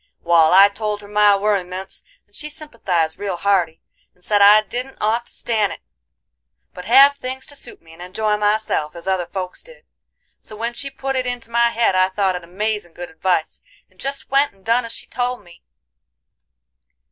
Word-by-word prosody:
Wal, 165 -2 +4
I 195 +2 +8
told 210 0 -4
her - - -11
my 210 0 +4
werryments 190 -2 -2 0.2
and - - -26
she 300 - -4
sympathized 190 - -2
real 195 -3 -3
hearty, 175 -4 0 0.3
and 180 - -24
said 205 +1 +2
I 210 +1 +7
didn't 250 +4 -6
ought 225 +3 0
to - - -8
stan' 215 -3 -1
it, - - -9 0.9
but 180 - -9
have 275 +5 +6
things 260 0 -6
to 285 - -13
suit 280 - -9
me, 165 0 -16
and 165 - -14
enjoy 210 +4 -1
myself, 210 -7 0
as 170 +2 -9
other 185 -2 0
folks 185 -1 -6
did. - - -17 0.5
So 215 - -12
when 230 +2 -3
she 275 +3 -6
put 270 0 -4
it 255 -1 -1
into 245 -2 -5
my 235 0 +3
head 230 -3 +1
I 185 0 +3
thought 190 -1 0
it 180 - -6
amazin' 200 0 -3
good 175 0 -8
advice, 160 0 -1 0.3
and - - -31
jest 275 0 -5
went 275 +1 +3
and 195 -1 -28
done 230 +2 +2
as 230 - -6
she - - -7
told 245 0 -3
me. 175 -1 -17
210 Hz, 195 wpm, -20 LUFS, 180-240 Hz, 0.9 s, I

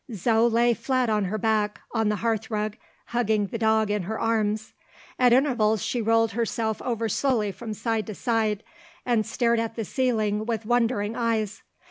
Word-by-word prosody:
Zo 225 +4 +3
lay 235 +1 +3
flat 255 -1 0
on 210 -2 +1
her 205 +4 -2
back, 215 -1 0
on 225 -2 +1
the 210 - +1
hearth 225 +1 -1
rug, 215 -1 -2 0.3
hugging 220 -3 +1
the 230 +3 -5
dog 220 -1 +2
in 210 -1 0
her 215 +5 -4
arms. 220 -1 0 0.5
At 250 -1 +5
intervals, 240 -5 +3
she 245 - -1
rolled 225 0 +3
herself 225 -1 -2
over 230 -2 -1
slowly 220 -2 +1
from 215 +3 -7
side 225 -1 -2
to 215 - -6
side, 220 -2 0 0.4
and 230 -3 +1
stared 235 0 +1
at 225 0 -3
the 225 - -3
ceiling 215 -4 0
with 225 -2 -2
wondering 230 -2 +1
eyes. 225 -4 -1
225 Hz, 175 wpm, -25 LUFS, 215-235 Hz, 0.5 s, At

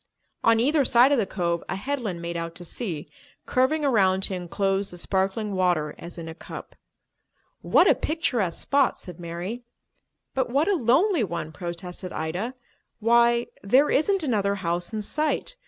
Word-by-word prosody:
On 230 -1 +5
either 285 +5 +3
side 245 +2 +5
of 280 - +3
the 205 - 0
cove 170 -3 -1
a - - -1
headland 210 -6 -3
made 170 0 -4
out 165 0 -4
to 175 - -6
sea, 175 -4 -5 0.4
curving 290 +4 +1
around 190 -7 +3
to 190 - +1
enclose 195 +2 -1
the 175 - -6
sparkling 195 +3 -1
water 175 -5 +1
as 170 +1 -8
in 165 -1 -7
a 160 - -6
cup. - - -10 0.9
"What - - +4
a - - +7
picturesque 245 - -1
spot!" 280 -2 +2
said 180 -2 -8
Mary. 175 +7 -5 0.7
"But 260 -2 0
what 280 +7 +2
a 410 - +3
lonely 315 - +3
one!" 170 -4 -4
protested 175 +3 -6
Ida. 180 +11 -3 0.4
"Why, 235 +1 +4 0.2
there 260 +9 +4
isn't 380 +5 +2
another 205 -7 +1
house 175 -1 -2
in 215 -1 -3
sight. 305 - -1
200 Hz, 165 wpm, -25 LUFS, 175-255 Hz, 0.9 s, a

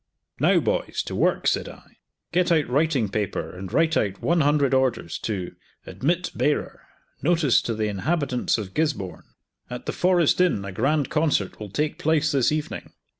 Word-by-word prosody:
"Now - - +4
boys - - -1
to - - -6
work," - - +1
said - - +1
I. - - -16 0.3
"Get 175 0 +2
out 155 -4 +3
writing 140 -2 +1
paper 105 -1 -3
and 90 0 -7
write 160 0 +2
out 100 -2 0
one 170 -1 +2
hundred 145 -2 +2
orders 130 -3 0
to 95 -5 -4 0.3
'Admit 175 +6 -1
bearer. 150 - -1 0.3
Notice 155 -3 +3
to 115 - -3
the 110 0 -1
inhabitants 125 - 0
of 100 -4 -6
Gisborne! 150 - -3 0.3
At 125 0 -7
the - - -3
Forest 180 -2 +3
Inn 155 - +2
a 100 - -5
grand 135 +8 0
concert 150 - 0
will 105 -1 -7
take 150 +9 -2
place 155 0 +2
this 135 -3 +2
evening! 155 -1 -4
140 Hz, 170 wpm, -24 LUFS, 110-160 Hz, 0.3 s, Now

